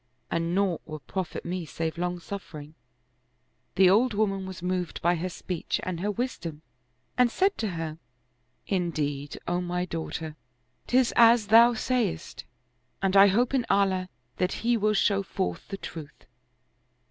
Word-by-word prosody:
And 170 +1 0
naught 195 -4 +1
will 155 -1 -8
profit 185 +3 -5
me 180 +1 -3
save 160 +1 -4
long 175 +1 -2
suffering." 160 -5 -8 1.0
The 190 0 +6
old 220 +5 +4
woman 195 -2 0
was 185 -2 -8
moved 180 -1 -2
by 175 +1 +4
her 175 +2 -2
speech 180 -1 -3
and 185 -2 -3
her 200 +4 -1
wisdom 195 -9 -4 0.6
and 250 -1 +6
said 390 - +1
to 220 - 0
her, 160 -1 -4 0.4
" 125 - -45 0.3
Indeed, 150 -6 -2
O 175 +1 0
my 180 0 -2
daughter, 160 -2 -5 0.5
'tis 255 -1 +3
as 230 -1 +6
thou 235 +2 +7
sayest, 240 - -2 0.6
and 195 0 +2
I 195 +1 +9
hope 235 +7 +2
in 260 -3 +2
Allah 190 -2 +2 0.3
that 180 0 0
He 240 0 +4
will 215 -1 +1
show 200 0 +3
forth 190 -1 -3
the 195 - -5
truth. 160 -6 -9
185 Hz, 155 wpm, -27 LUFS, 165-210 Hz, 1.0 s, I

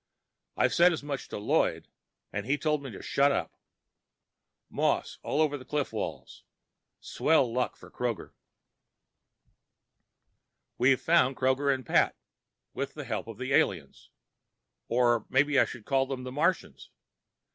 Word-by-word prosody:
I - - +4
said 175 -1 +5
as 155 - -5
much 140 -2 -5
to - - -6
Lloyd 105 - 0 0.5
and 105 +2 -4
he 140 +2 +1
told 150 0 0
me 135 - -7
to 105 - -10
shut 140 +1 +3
up. - - -2 1.1
Moss - - -1
all 155 - +1
over 145 -2 -1
the - - -11
cliff 145 +2 -2
walls. - - -6 0.6
Swell 135 -7 +1
luck 125 0 -1
for - - -15
Kroger. 120 -7 -3 2.5
We've 130 +1 +4
found 160 -6 +3
Kroger 130 +2 +2
and 130 -2 -2
Pat, - - +2 0.6
with 140 0 -4
the 150 -2 -6
help 115 -3 -4
of 115 -2 -8
the 130 +2 -3
aliens. 80 - 0 0.8
Or 120 -2 +2
maybe 140 +1 +3
I - - +5
should 120 -3 -10
call 135 -1 +1
them 130 -1 -5
the 125 - -6
Martians. 160 +5 -1
135 Hz, 145 wpm, -29 LUFS, 125-145 Hz, 2.5 s, said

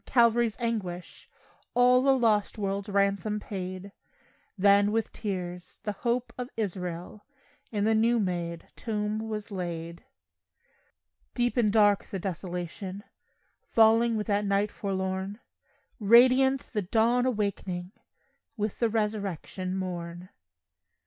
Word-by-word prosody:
Calvary's 235 -2 +3
anguish 195 -7 -4 0.5
All 250 +2 +5
a 270 - +5
lost 220 -3 +2
world's 200 0 -2
ransom 200 +1 +1
paid; 185 -1 -6 0.7
Then, 200 +1 +5
with 225 0 -1
tears, 180 -3 -5
"the 210 - -1
hope 235 +4 -2
of 250 0 -4
Israel" 180 -1 -4 0.5
In 205 -3 -1
the 220 +1 +3
new 230 +2 +3
made 170 -4 -3
tomb 210 -2 -2
was 215 0 -5
laid. 170 -3 -5 1.3
Deep 245 -1 +1
and 225 -4 +3
dark 205 -2 +4
the 195 - -5
desolation 185 +1 -5 0.7
Falling 225 +1 +4
with 210 - -2
that 205 -1 +1
night 200 +1 +1
forlorn; 190 +1 -3 0.6
Radiant 255 +5 +5
the 210 - +1
dawn 230 +6 +2
awakening 195 -5 -2 0.7
With 210 -1 -2
the 230 - +2
resurrection 200 -4 -2
morn. 175 -1 -5
205 Hz, 115 wpm, -28 LUFS, 185-225 Hz, 1.3 s, All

